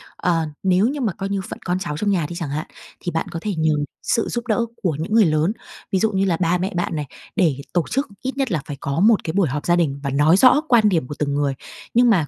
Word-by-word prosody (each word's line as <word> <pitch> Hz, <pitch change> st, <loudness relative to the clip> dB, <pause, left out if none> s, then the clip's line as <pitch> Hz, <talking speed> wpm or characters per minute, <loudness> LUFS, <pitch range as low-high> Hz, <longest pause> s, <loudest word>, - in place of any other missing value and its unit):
Ờ, 165 Hz, -3 st, +1 dB, 0.2 s
nếu 190 Hz, +3 st, +3 dB
như 285 Hz, +1 st, -2 dB
mà 220 Hz, -7 st, 0 dB
coi 195 Hz, +3 st, -5 dB
như 200 Hz, -1 st, -1 dB
phận -, -, -7 dB
con 180 Hz, +1 st, 0 dB
cháu 150 Hz, -6 st, -4 dB
trong 205 Hz, +3 st, 0 dB
nhà 175 Hz, -5 st, +1 dB
đi 175 Hz, -, -6 dB
chẳng 165 Hz, -4 st, -4 dB
hạn, 150 Hz, +3 st, -3 dB, 0.3 s
thì 175 Hz, -, -4 dB
bạn 165 Hz, -, -2 dB
có 165 Hz, -, -4 dB
thể 210 Hz, -, -2 dB
nhờ 160 Hz, 0 st, +2 dB, 0.3 s
sự 230 Hz, -, +1 dB
giúp 240 Hz, 0 st, -3 dB
đỡ 230 Hz, +1 st, +1 dB, 0.2 s
của 165 Hz, -6 st, +1 dB
những 170 Hz, +6 st, -3 dB
người 220 Hz, -2 st, +6 dB
lớn, 155 Hz, +3 st, +2 dB, 0.4 s
ví 190 Hz, -, +2 dB
dụ 220 Hz, +1 st, +2 dB
như 195 Hz, 0 st, +1 dB
là 175 Hz, -4 st, +1 dB
ba 180 Hz, 0 st, +2 dB
mẹ 185 Hz, +2 st, -3 dB
bạn 175 Hz, -2 st, -1 dB
này, 150 Hz, -, -2 dB, 0.3 s
để 160 Hz, -, +2 dB, 0.2 s
tổ 175 Hz, -3 st, +2 dB
chức 275 Hz, +2 st, 0 dB
ít 265 Hz, +1 st, -4 dB
nhất 270 Hz, -4 st, 0 dB
là 160 Hz, -6 st, 0 dB
phải 145 Hz, -, -6 dB
có 140 Hz, +3 st, -2 dB
một 215 Hz, +2 st, +4 dB
cái 160 Hz, -, -3 dB
buổi 195 Hz, -5 st, +2 dB
họp 145 Hz, +2 st, -3 dB
gia 175 Hz, -, +4 dB
đình 145 Hz, -5 st, 0 dB
và 140 Hz, -, -1 dB
nói 150 Hz, +6 st, +4 dB
rõ 260 Hz, +6 st, +6 dB
quan 225 Hz, -4 st, +5 dB
điểm 165 Hz, -9 st, 0 dB
của 150 Hz, -, -6 dB
từng 140 Hz, -1 st, 0 dB
người. 145 Hz, -1 st, +1 dB, 0.4 s
Nhưng 240 Hz, +1 st, +5 dB
mà 175 Hz, -9 st, +3 dB
180 Hz, 285 wpm, -21 LUFS, 155-210 Hz, 0.4 s, người